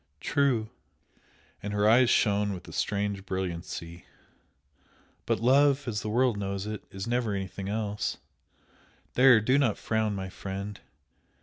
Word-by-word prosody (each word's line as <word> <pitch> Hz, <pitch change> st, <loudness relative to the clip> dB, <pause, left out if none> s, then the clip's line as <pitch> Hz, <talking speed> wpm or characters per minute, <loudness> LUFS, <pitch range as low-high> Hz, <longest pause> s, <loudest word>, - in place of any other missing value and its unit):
"True!" 120 Hz, -, +1 dB, 0.9 s
and 105 Hz, 0 st, -4 dB
her 105 Hz, 0 st, +2 dB
eyes 120 Hz, +2 st, +6 dB
shone 105 Hz, -1 st, +2 dB
with 90 Hz, -1 st, -9 dB
a -, -, -10 dB
strange 100 Hz, -1 st, -1 dB
brilliancy 85 Hz, -2 st, -5 dB, 1.2 s
"But -, -, +1 dB
love 140 Hz, +3 st, +4 dB
as 105 Hz, -3 st, -2 dB
the 105 Hz, -, -4 dB
world 120 Hz, 0 st, +2 dB
knows 100 Hz, 0 st, -3 dB
it 105 Hz, -1 st, -5 dB
is 95 Hz, 0 st, -6 dB
never 120 Hz, -3 st, 0 dB
anything 95 Hz, 0 st, -5 dB
else! 105 Hz, -1 st, -2 dB, 1.0 s
There, 130 Hz, -3 st, +7 dB
do 130 Hz, +6 st, +2 dB
not 120 Hz, -7 st, +2 dB
frown, 110 Hz, -2 st, -1 dB
my 95 Hz, -1 st, -4 dB
friend! 100 Hz, +2 st, -6 dB
105 Hz, 135 wpm, -28 LUFS, 100-120 Hz, 1.2 s, There